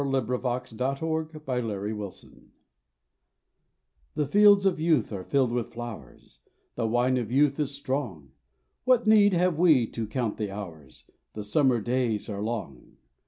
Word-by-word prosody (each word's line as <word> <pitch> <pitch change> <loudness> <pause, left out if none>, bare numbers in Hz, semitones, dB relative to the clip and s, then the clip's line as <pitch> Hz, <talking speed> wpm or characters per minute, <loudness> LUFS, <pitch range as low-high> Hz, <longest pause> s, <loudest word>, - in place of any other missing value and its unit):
The - - -2 0.2
Road 125 +2 -3 0.2
to 130 +6 -3
Old 160 -1 -4
Man's 105 -4 -3
Town - - -20 1.6
The 150 -1 0
fields 200 +5 +5
of 190 -5 +2
youth 155 -9 +1
are 95 -2 -5
filled 130 +2 +1
with 120 -1 -2
flowers, 110 - -10 0.3
The 115 -2 -2
wine 120 +3 +1
of 120 -3 -3
youth 140 +2 +2
is 145 -2 -2
strong: 130 - -4 0.5
What 250 -2 +3
need 210 -2 +5
have 175 -2 +1
we 155 -9 +5
to 115 -2 -4
count 115 0 -2
the 105 -2 -3
hours? 85 -10 -10 0.3
The 105 - -6
summer 130 +2 +2
days 120 -2 -1
are 100 -1 -4
long. 105 - -6
125 Hz, 150 wpm, -27 LUFS, 105-150 Hz, 1.6 s, fields